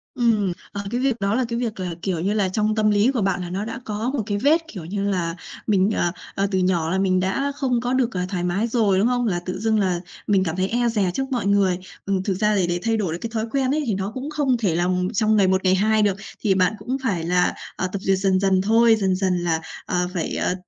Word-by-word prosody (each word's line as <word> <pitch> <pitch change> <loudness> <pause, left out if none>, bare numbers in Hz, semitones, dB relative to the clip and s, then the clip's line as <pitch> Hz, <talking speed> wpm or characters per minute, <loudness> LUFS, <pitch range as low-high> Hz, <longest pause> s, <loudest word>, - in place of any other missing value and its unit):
Ừm. 215 -6 +2 0.2
Ờ, 200 - -4
cái 240 - -1
việc 265 -2 +2
đó 200 +2 0
là 255 +1 +1
cái 235 0 -2
việc 225 -5 -3
là, 180 -2 -3
kiểu 185 -3 -1
như 195 +5 0
là, 205 -3 +1
trong 215 +3 0
tâm 215 -1 +3
lý 205 +5 +3
của 250 -5 -1
bạn 195 -1 0
là 175 - -5
nó 195 +4 -3
đã 230 - -5
có 215 +4 -2
một 255 -6 -1
cái 205 -1 -1
vết, 295 +9 +3
kiểu 185 - -8
như 200 +3 -2
là, 170 -4 -1 0.3
mình, 200 -1 +3
à, 175 -5 0 0.2
à, 195 +1 +1
từ 190 - +1
nhỏ 180 -3 +1
là 190 - +1
mình 185 -1 +2
đã 195 +10 0
không 255 -4 0
có 245 +1 -1
được, 255 -2 +1
à, 180 -1 -1
thoải 180 -3 -2
mái 185 +6 0
rồi, 220 -5 +2
đúng 210 - +3
không? 245 0 +1
Là 175 -4 0
tự 185 0 -4
dưng 220 0 +1
là 185 -3 +1 0.3
mình 195 -2 +3
cảm 160 -3 -2
thấy 185 +1 0
e 240 +2 +1
dè 205 -5 +1
trước 270 +4 -3
mọi 245 -5 -1
người. 200 -3 +2 0.3
Ừm, 195 -1 0
thực 195 - 0
ra 210 +2 +1
thì 185 -3 +2
để 175 0 -1
thay 225 0 +1
đổi 190 -7 -1
được 170 - -5
cái 230 - -3
thói 220 -1 -1
quen 270 -2 +1
ấy 305 +1 0
thì 220 - +1
nó 195 +1 -3
cũng 265 +4 -5
không 290 -5 +1
thể 195 -8 0
là 175 +1 +1 0.3
trong 215 +1 +2
ngày 200 -3 +4
một, 190 0 +1
ngày 185 0 +4
hai 215 +3 +2
được, 200 -2 +2 0.2
thì 205 -4 +2
bạn 185 +1 +3
cũng 245 +6 -3
phải 190 -10 0
là, 180 +1 +2 0.2
à, 185 - -1
tập 200 - -2
duyệt 190 0 +2
dần 190 -1 +2
dần 190 -1 +2
thôi, 225 +3 +5
dần 190 -2 +1
dần 185 -1 +1
là, 165 -2 0 0.2
à, 180 0 0
phải, 175 -4 -2
à, - - 0
200 Hz, 280 wpm, -22 LUFS, 185-230 Hz, 0.3 s, thôi